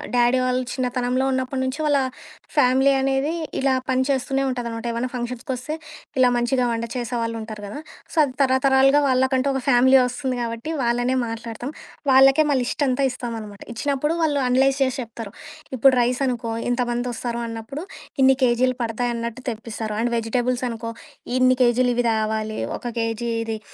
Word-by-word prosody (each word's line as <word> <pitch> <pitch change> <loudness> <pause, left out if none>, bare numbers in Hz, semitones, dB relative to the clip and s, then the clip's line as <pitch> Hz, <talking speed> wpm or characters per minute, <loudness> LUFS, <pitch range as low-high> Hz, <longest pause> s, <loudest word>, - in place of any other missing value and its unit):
Daddy 245 +1 +4
వాళ్ళు 255 0 +1
చిన్నతనంలో 250 0 0
ఉన్నప్పటి 260 0 -1
నుంచి 260 +3 -3
వాళ్ళ 290 -2 +3 0.6
ఫ్యామిలీ 265 -1 +4
అనేది 270 +3 +1 0.3
ఇలా 270 0 +2 0.2
పని 260 0 +2
చేస్తూనే 270 0 0
ఉంటదనమాట. 235 -3 -4
ఏమన్నా 235 +2 -2
ఫంక్షన్స్‌కొస్తే 250 +4 -4 0.4
ఇలా 255 -1 +6
మంచిగా 245 +1 +1
వంట 230 0 -2
చేసే 245 0 -3
వాళ్ళుంటారు 225 -2 -5
కదా, 210 +8 -7 0.3
సో, - - -10
అది 270 -3 -2
తరతరాలుగా 270 +1 +4
వాళ్ళకంటూ 260 +1 +2
ఒక 265 - -1
ఫ్యామిలీ 260 +1 +6
ఒస్తుంది 250 0 -3
కాబట్టి 230 +4 -4
వాళ్ళనే 245 +2 +1
మాట్లాడతాం. 230 +3 -6 0.4
వాళ్ళకే 270 +3 +6
మా 275 - +3
లిష్ట్ 285 +4 -1
అంతా 255 +2 +1
ఇస్తామనమాట, 225 -5 -7
ఇచ్చినప్పుడు 285 +5 0
వాళ్ళు 290 -3 +1
అనలైజ్ 265 +2 +3
చేసి 260 +1 -1
చెప్తరు. 225 -2 -9 0.4
ఇప్పుడు 265 +3 +6
రైస్ 245 +2 0
అనుకో, 235 -2 -2 0.2
ఇంతమందొస్తారు 240 -1 -2
అన్నప్పుడు 230 +7 -6 0.4
ఇన్ని 265 0 +5
కేజీలు 250 +1 +2
పడతాయన్నట్టు 235 +1 -3
తెప్పిస్తారు, 220 -1 -5
అండ్ 240 0 0
వెజిటేబుల్స్ 245 +2 -1
అనుకో, 230 0 -5 0.5
ఇన్ని 255 0 +4
కేజీలు 245 +1 +3
ఇవి 245 0 +1
తావాలి, 220 0 -1 0.2
ఒక - - -6
కేజీ 230 +1 -2 0.2
ఇది 220 -1 -3
250 Hz, 150 wpm, -23 LUFS, 235-265 Hz, 0.6 s, ఇలా